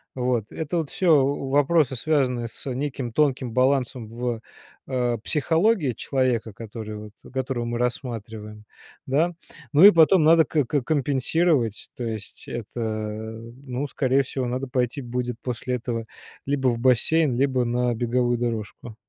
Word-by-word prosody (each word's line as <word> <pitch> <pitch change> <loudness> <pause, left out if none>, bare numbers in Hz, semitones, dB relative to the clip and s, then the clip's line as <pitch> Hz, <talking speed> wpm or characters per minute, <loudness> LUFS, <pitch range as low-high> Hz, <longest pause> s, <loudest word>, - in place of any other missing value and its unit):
Вот, 125 -4 -1
это 160 +2 -3
вот 160 -4 -2
всё 160 -7 +4
вопросы, 140 +1 +2
связанные 125 -3 0
с 130 +3 -5
неким 130 -2 -3
тонким 135 -3 +1
балансом 130 -2 +1
в, 115 0 -3 0.5
э, 125 -3 0
психологии 160 - +2
человека, 120 -3 -1
который 110 0 -7
вот, 105 0 -10 0.2
которого 130 -2 -2
мы 120 0 -3
рассматриваем. 110 -4 -4 0.4
Да? 160 +6 +2 0.4
Ну 155 +6 +6
и 205 - +13
потом 165 +1 +5
надо 160 +1 +6
к 150 -4 0 0.2
компенсировать. 140 - +1
То 125 - -4
есть, 110 -3 -6
это, 120 0 -6 0.9
ну, 130 +2 -3
скорее 135 -1 +2
всего, 130 -1 -3
надо 125 +2 -3
пойти 125 +2 -1
будет 125 -1 -3
после 125 0 -3
этого 115 -1 -4 0.4
либо 135 -2 0
в 120 -2 +2
бассейн, 130 +4 +3
либо 130 -1 +2
на 120 0 0
беговую 120 +1 +1
дорожку. 115 -1 -4
125 Hz, 140 wpm, -24 LUFS, 120-140 Hz, 0.9 s, и